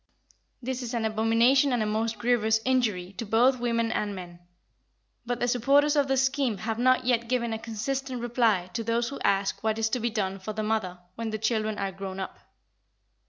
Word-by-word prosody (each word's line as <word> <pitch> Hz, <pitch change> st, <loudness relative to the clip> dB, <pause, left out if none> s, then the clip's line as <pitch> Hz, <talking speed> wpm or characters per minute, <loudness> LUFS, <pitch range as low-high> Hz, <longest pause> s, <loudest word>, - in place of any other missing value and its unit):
This 260 Hz, +1 st, -3 dB
is 245 Hz, 0 st, -4 dB
an 225 Hz, -1 st, -1 dB
abomination 230 Hz, +5 st, +3 dB
and 240 Hz, -3 st, +1 dB
a -, -, -1 dB
most 220 Hz, +1 st, -1 dB
grievous 220 Hz, -1 st, +2 dB
injury 215 Hz, -8 st, 0 dB
to -, -, -1 dB
both 245 Hz, +4 st, +3 dB
women 230 Hz, -1 st, 0 dB
and 205 Hz, -1 st, -2 dB
men. 175 Hz, -2 st, -9 dB, 0.9 s
But 245 Hz, 0 st, -2 dB
the 245 Hz, -, 0 dB
supporters 275 Hz, +5 st, +3 dB
of 285 Hz, -2 st, +3 dB
the 270 Hz, 0 st, +1 dB
scheme 265 Hz, -4 st, +1 dB
have 220 Hz, +3 st, -3 dB
not 255 Hz, 0 st, +3 dB
yet 235 Hz, -2 st, +1 dB
given 235 Hz, -2 st, 0 dB
a 220 Hz, -, -3 dB
consistent 250 Hz, +4 st, -3 dB
reply 230 Hz, -6 st, +1 dB
to 230 Hz, -, -2 dB
those 230 Hz, +1 st, 0 dB
who 280 Hz, -, -7 dB
ask 195 Hz, +1 st, 0 dB
what 220 Hz, 0 st, 0 dB
is 225 Hz, 0 st, +1 dB
to 250 Hz, -, -1 dB
be 235 Hz, +1 st, 0 dB
done 195 Hz, -3 st, -2 dB
for 215 Hz, +3 st, -5 dB
the 215 Hz, 0 st, -3 dB
mother 210 Hz, -5 st, -1 dB, 0.2 s
when 230 Hz, +2 st, -4 dB
the 215 Hz, -, -3 dB
children 215 Hz, -1 st, -1 dB
are 195 Hz, -1 st, -2 dB
grown 190 Hz, 0 st, -6 dB
up. 190 Hz, -, -6 dB
230 Hz, 205 wpm, -27 LUFS, 215-245 Hz, 0.9 s, abomination